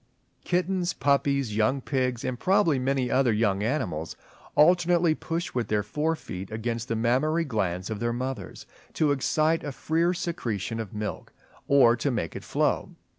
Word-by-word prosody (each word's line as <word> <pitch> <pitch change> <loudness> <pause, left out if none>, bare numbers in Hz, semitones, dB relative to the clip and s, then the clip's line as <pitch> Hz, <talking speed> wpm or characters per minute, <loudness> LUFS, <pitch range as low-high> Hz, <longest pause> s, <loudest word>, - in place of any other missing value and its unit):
Kittens, 180 0 0
puppies, 140 -4 +1
young 110 +6 +2
pigs 125 -2 -1
and 130 -1 -3
probably 185 -7 +3
many 130 -1 0
other 130 -2 +3
young 105 -2 +1
animals, 95 - -2 0.4
alternately 175 +1 +4
push 165 +2 -4
with 120 -2 -1
their 105 -1 0
forefeet 145 - -3
against 115 +1 -3
the 115 - -1
mammary 135 +9 +1
glands 95 - -2
of 105 - -3
their 120 +1 0
mothers, 125 -4 -5 0.3
to 150 -2 +2
excite 155 +4 +1
a 145 - -4
freer 160 +7 +1
secretion 115 - -3
of 110 -4 -5
milk, 105 0 -5 0.3
or 135 -4 +6
to 120 +5 -1
make 110 - -2
it - - -6
flow. - - -1
130 Hz, 155 wpm, -26 LUFS, 110-155 Hz, 0.4 s, or